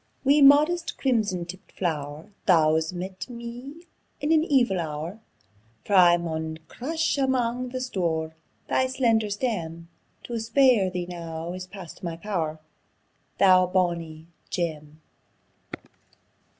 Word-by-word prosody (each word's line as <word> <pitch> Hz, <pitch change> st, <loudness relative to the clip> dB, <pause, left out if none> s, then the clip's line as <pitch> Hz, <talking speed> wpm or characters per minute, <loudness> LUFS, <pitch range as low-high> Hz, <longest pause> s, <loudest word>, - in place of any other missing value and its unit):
Wee, 285 Hz, +2 st, +4 dB
modest 305 Hz, +5 st, +5 dB
crimson 210 Hz, -9 st, 0 dB
tipped 185 Hz, +3 st, -11 dB
flow'r, 150 Hz, -2 st, -3 dB, 0.2 s
Thou's 160 Hz, -2 st, +4 dB
met 185 Hz, +1 st, -6 dB
me 245 Hz, +7 st, -9 dB, 0.3 s
in 295 Hz, +2 st, -1 dB
an 315 Hz, -1 st, +5 dB
evil 245 Hz, -, +2 dB
hour; 160 Hz, +5 st, -5 dB, 0.7 s
For 205 Hz, -, -3 dB
I 175 Hz, -2 st, +7 dB
maun 160 Hz, -2 st, -4 dB
crush 320 Hz, +3 st, -2 dB
amang 250 Hz, -2 st, 0 dB
the 255 Hz, +1 st, -4 dB
stoure 165 Hz, -10 st, -2 dB, 0.3 s
Thy 260 Hz, -, +2 dB
slender 230 Hz, -5 st, +1 dB
stem: 170 Hz, -7 st, -3 dB, 0.3 s
To 235 Hz, -1 st, -4 dB
spare 230 Hz, -3 st, +4 dB
thee 180 Hz, -1 st, -3 dB
now 170 Hz, -1 st, -6 dB
is 185 Hz, 0 st, -7 dB
past 185 Hz, -3 st, -11 dB
my 170 Hz, -2 st, -4 dB
pow'r, 165 Hz, -5 st, -3 dB, 0.8 s
Thou 185 Hz, -2 st, +6 dB
bonie 170 Hz, -4 st, -1 dB, 0.2 s
gem. 155 Hz, -3 st, -4 dB
185 Hz, 120 wpm, -26 LUFS, 165-245 Hz, 0.8 s, I